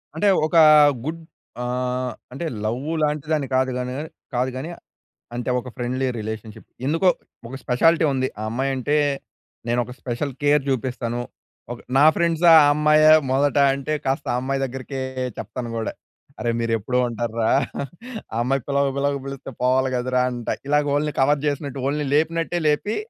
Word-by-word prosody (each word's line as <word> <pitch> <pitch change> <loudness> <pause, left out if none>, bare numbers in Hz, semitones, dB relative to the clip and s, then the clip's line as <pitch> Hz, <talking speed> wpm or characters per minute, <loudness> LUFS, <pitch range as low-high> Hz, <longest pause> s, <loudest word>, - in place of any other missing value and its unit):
అంటే 185 +6 +1 0.2
ఒక 160 - -4 0.5
గుడ్ 165 +2 -4 0.4
ఆహ్, 125 0 -2 0.2
అంటే 140 +7 -5 0.2
లవ్ 120 +4 -1 0.2
లాంటి 150 -1 -1
దాన్ని 145 -3 0
కాదు 130 0 +2
గాని 125 0 -3
కాని, 155 +2 -5 0.3
కాదు 125 +2 +1
గాని 145 +6 -5 0.7
అం‌తే 125 +1 -2
ఒక 125 - -8
ఫ్రెండ్లీ 130 +2 -2
రిలేషన్షిప్. 110 0 -7 0.2
ఎందుకో 165 +6 +1 0.4
ఒక 130 - -8
స్పెషాలిటీ 160 +6 +3
ఉంది. 130 0 0
ఆ - - -3
అమ్మాయి 135 +4 -1
అంటే, 140 +3 0 0.7
నేను 120 +1 +1
ఒక 125 - -10
స్పెషల్ 130 +3 -3
కేర్ 145 -1 +3
చూపిస్తాను. 120 -2 -2 0.5
ఒక 120 - -6 0.2
నా 145 - +6
ఫ్రెండ్సా 170 0 +3
ఆ - - +6
అమ్మాయా 150 +1 +5 0.2
మొదట 140 +2 +2 0.2
అంటే 140 +2 -3
కాస్త 135 +1 -1
ఆ 125 - +1
అమ్మాయి 135 +1 -1
దగ్గరికే 135 +1 -6 0.4
చెప్తాను 120 +3 -5
కూడా. 110 - -2 0.5
"అరె! 120 - 0
మీరు 115 0 0
ఎప్పు‌డు 125 +4 -1
ఉంటా‌ర్రా 115 -1 -1 0.8
ఆ - - -4
అమ్మాయి 135 0 0
పిలవక 140 -1 +1
పిలవ‌క 140 0 0
పిలిస్తే 135 -1 -7
పోవాలి 130 +1 +2
కదరా" 125 +1 +1
అంట. 120 -1 -7 0.2
ఇలాగ 150 0 +3
వోల్ని 150 +1 0
కవర్ 145 +2 +2
చేసినట్టు 140 -2 -3
వోల్ని 145 +1 -1
లేపినట్టే 165 +3 0
లేపి 150 +8 +1
135 Hz, 160 wpm, -22 LUFS, 125-150 Hz, 0.8 s, నా